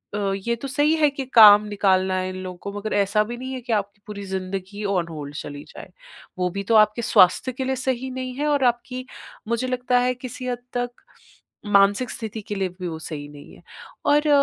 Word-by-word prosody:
अ, 200 -1 0
ये 235 - +2
तो 275 - -4
सही 290 +3 +2
है 300 -2 +4
कि 275 -1 -5
काम 210 -2 +9
निकालना 190 -2 +2
है 185 0 -1
इन 185 - -6
लोगों 180 -1 -7
को 200 - -5
मगर 215 +1 -4
ऐसा 205 +1 +2
भी 235 +3 -6
नहीं 260 +1 -6
है 260 - -4
कि 235 -1 -2
आपकी 200 -1 -2
पूरी 200 -1 -7
ज़िंदगी 190 +2 -5
ऑन 185 -4 0
होल्ड 145 -3 -7
चली 145 -1 -7
जाए। - - -11 0.5
वो 180 0 +1
भी 200 - -2
तो - - +5
आपके 215 +2 +4
स्वास्थ्य 185 +3 +4
के 260 +2 -4
लिए 265 0 0
सही 260 0 -2
नहीं 255 0 -5
है 295 +3 -1
और 290 -2 +2
आपकी 250 +1 -2 0.4
मुझे 235 +2 -1
लगता 250 0 +1
है 250 +1 +1
किसी 255 0 -7
हद 245 -1 -2 0.2
तक 245 0 -1 0.8
मानसिक 205 +4 +3
स्थिति 220 -1 -5
के 205 - -5
लिए 190 -1 0
भी 180 - -3
वो 160 -1 -5
सही 150 -2 -7
नहीं 145 -1 -13
है। - - -19 0.4
और 295 +1 +3
215 Hz, 220 wpm, -23 LUFS, 190-255 Hz, 0.8 s, काम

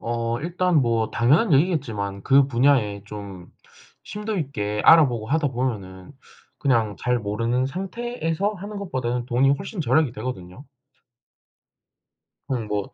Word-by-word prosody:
어 115 0 -2
일단 175 -1 +1
뭐 115 -2 0
당연한 145 - +3
얘기겠지만 120 - 0
그 135 0 +5
분야에 120 -6 +2
좀 100 -4 -9 0.6
심도 210 0 -4
있게 105 -9 -3
알아보고 125 -9 +5
하다보면은 125 - -2 0.5
그냥 115 -7 +1
잘 125 0 0
모르는 115 +4 -1
상태에서 195 - -3
하는 205 +2 -7
것보다는 125 -10 -3
돈이 130 +2 +3
훨씬 195 +5 -4
절약이 140 -1 +2
되거든요. 110 0 -7 1.8
그냥 120 -5 -3
뭐 105 -1 -3
125 Hz, 280 characters per minute, -23 LUFS, 110-160 Hz, 1.8 s, 그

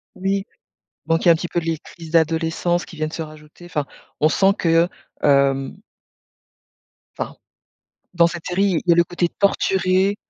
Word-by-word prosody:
Oui. 195 +1 -1 0.6
Donc 165 +2 +1
il - - +4
y - - +8
a - - +9
un - - +1
petit 175 - -4
peu 175 - -1
les 165 -1 -2
crises 165 -2 -12
d'adolescence 165 +1 +1
qui 165 - -12
viennent 155 0 -3
se 165 - -5
rajouter, 155 +2 -11
enfin, 150 -5 -2 0.4
on 155 - +5
sent 195 +3 +3
que, 165 0 +3 0.3
hem 140 +1 +2 1.4
enfin. - - -4 0.8
Dans 170 -1 +5
cette 170 -1 -7
série, 185 -1 +1
il - - -4
y 170 - +8
a - - +1
le 170 - +5
côté 175 0 -1
torturé 190 0 +2
170 Hz, 175 wpm, -21 LUFS, 160-180 Hz, 1.4 s, a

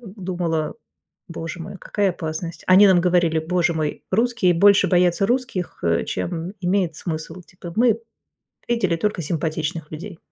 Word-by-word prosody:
думала: 180 -6 -3 0.5
боже 170 0 -6
мой, 195 +4 -7
какая 200 +2 0
опасность. 165 0 -5
Они 190 +2 +7
нам 185 -2 +5
говорили: 175 -2 +2
"Боже 175 +1 0
мой, 155 -2 -3
русские 225 -3 +2
больше 200 +2 +5
боятся 180 +2 +3
русских, 235 -7 -2
э, 85 0 +2
чем 175 +2 -4
имеет 180 -3 0
смысл." 165 +1 -5
Типа: 175 -1 -11
"Мы 230 -1 +3 0.7
видели 200 -8 +1
только 200 +1 -1
симпатичных 160 0 -3
людей." 170 +4 -8
175 Hz, 140 wpm, -22 LUFS, 165-195 Hz, 0.7 s, Они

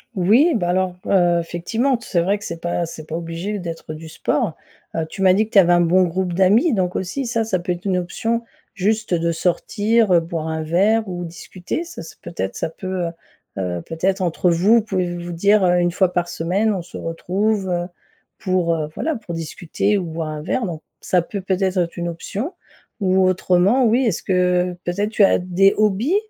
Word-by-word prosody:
Oui 230 - +4
bah 180 -6 0
alors, 185 0 0
heu, 175 -3 +3
effectivement 180 +11 -1
d - - -5
c'est 175 - 0
vrai 195 +5 +1
que 205 - -12
c'est 170 - -5
pas 175 0 -1
c'est 160 -1 -9
pas 160 - -4
obligé 170 +5 -4
d'être 165 -2 -6
du 160 +1 -9
sport. 205 - -1 0.4
Heu, 165 - -1
tu 195 - -7
m'as 185 -1 +6
dit 210 +3 +2
que 220 - -18
tu - - +4
avais 175 -2 +5
un 175 - +5
bon 175 +2 +4
groupe 180 +1 -1
d'amis 205 - +4
donc 185 -4 0
aussi 195 +9 -3
ça, 230 -2 0
ça 190 -4 0
peut 175 +1 -3
être 175 +1 -5
une 190 -2 +1
option, 225 +6 -2 0.3
juste, 215 +1 0
heu, 170 - +2
de 170 0 +1
sortir, 205 +6 +1
heu, 175 - +6
boire 165 -1 -4
un 160 0 -2
verre 200 +7 +2
ou 175 -1 -4
discuter. 175 - -5
Ça 345 - -9
ça 165 - -11
peu 175 - -9
être 95 0 -3
ça - - -2
peut, 185 +1 -4
heu - - -1 0.5
heu, 90 -3 -2
peut-être 185 +4 -1
entre 175 0 +1
vous, 205 +7 +4
pouvez 185 -4 -2
vous 175 - -6
vous 175 - -5
dire, 200 +4 +3
heu: 180 -1 +4
«1 175 0 +2
fois 185 -1 +2
par 175 -1 0
semaine 190 +7 0
on 185 - -3
se 175 - -10
retrouve, 190 +4 -1
heu, 175 0 -1 0.5
pour, 180 -3 +1
heu, 155 -2 -3
voilà 320 0 -1
pour 210 -6 -7
discuter 175 +5 -1
ou 190 - -2
boire 165 -1 -4
un 155 -1 -5
verre» 225 +9 -1
donc 165 -3 -5 0.2
ça 180 - +1
peut 200 +4 -5
peut-être 190 0 -1
être 170 -2 0
une 175 0 -2
option. 205 - -5 0.5
Ou 190 -2 +3
autrement 185 +6 +3
oui 235 +4 +3
est-ce 210 -8 -1
que 180 -1 +1
peut 175 - -2
être 205 +1 0
tu 215 -1 +3
as 195 - +5
des 185 +2 +3
hobbies? 215 - +2
180 Hz, 220 wpm, -21 LUFS, 170-205 Hz, 0.5 s, m'as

